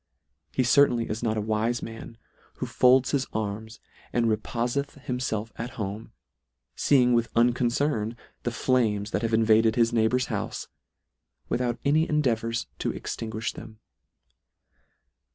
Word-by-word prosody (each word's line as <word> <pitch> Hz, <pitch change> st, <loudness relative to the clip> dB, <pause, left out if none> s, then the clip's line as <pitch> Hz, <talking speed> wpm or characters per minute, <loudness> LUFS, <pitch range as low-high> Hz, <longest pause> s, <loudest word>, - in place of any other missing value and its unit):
He 130 Hz, -, +1 dB
certainly 120 Hz, -1 st, +4 dB
is 110 Hz, +1 st, -4 dB
not 110 Hz, -2 st, 0 dB
a -, -, 0 dB
wife 110 Hz, +2 st, 0 dB
man, 115 Hz, 0 st, -8 dB, 0.4 s
who -, -, -4 dB
folds 130 Hz, +1 st, +4 dB
his 135 Hz, -2 st, 0 dB
arms 110 Hz, +1 st, -4 dB, 0.3 s
and 120 Hz, -1 st, +1 dB
repofeth 120 Hz, +6 st, -1 dB
himself 115 Hz, -4 st, -3 dB
at 120 Hz, +2 st, -5 dB
home, 105 Hz, +1 st, -5 dB, 0.6 s
feeing 125 Hz, -3 st, +3 dB
with 115 Hz, -1 st, +2 dB
unconcern 120 Hz, 0 st, +1 dB, 0.2 s
the -, -, -1 dB
flames 110 Hz, -3 st, +1 dB
that -, -, 0 dB
have 115 Hz, -1 st, -1 dB
invaded 110 Hz, 0 st, +4 dB
his 115 Hz, -1 st, +3 dB
neighbour's 120 Hz, +3 st, +2 dB
houfe, -, -, -3 dB, 0.8 s
without 120 Hz, -1 st, 0 dB
any 155 Hz, +3 st, +3 dB
endea 150 Hz, -6 st, +2 dB
vours 115 Hz, +1 st, -3 dB
to -, -, -1 dB
extinguish 110 Hz, 0 st, -4 dB
them. 110 Hz, -1 st, -11 dB
115 Hz, 135 wpm, -26 LUFS, 110-125 Hz, 0.8 s, certainly